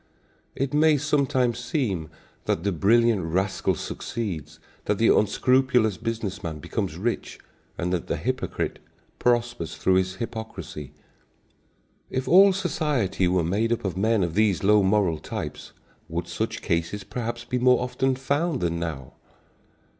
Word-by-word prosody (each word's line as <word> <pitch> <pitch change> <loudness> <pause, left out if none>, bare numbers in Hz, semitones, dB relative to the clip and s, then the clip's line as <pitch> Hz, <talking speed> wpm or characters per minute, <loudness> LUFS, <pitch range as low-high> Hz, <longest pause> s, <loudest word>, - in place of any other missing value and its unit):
It 135 +1 -2
may 155 0 +5
sometimes 135 -4 +1
seem 120 - -2 0.4
that 85 - 0
the 100 - +1
brilliant 110 +3 +3
rascal 95 +4 0
succeeds, 80 -10 -5 0.3
that 105 - +1
the 115 - +5
unscrupulous 125 0 +3
business 110 -3 -3
man 80 -2 -4
becomes 85 +3 -3
rich, 115 +6 -3 0.4
and 90 +1 -1
that 85 - -2
the - - -1
hypocrite - - -2 0.4
prospers 120 -7 0
through 95 0 +2
his 95 0 0
hypocrisy. 110 - -6 1.2
If 130 0 -3
all 195 +3 +7
society 145 - 0
were 90 -1 +2
made 105 +7 0
up 120 - -1
of 95 -3 -2
men 110 +1 +2
of 85 -2 -2
these 100 -3 +2
low 105 +1 +5
moral 95 -5 +2
types, - - -6 0.4
would 85 +1 -3
such 110 +7 -3
cases 85 +3 -1
perhaps 120 +3 -5
be 125 +1 -1
more 125 0 +5
often 130 +1 0
found 140 +3 0
than 85 -1 0
now? 75 -6 -5
110 Hz, 140 wpm, -25 LUFS, 90-125 Hz, 1.2 s, all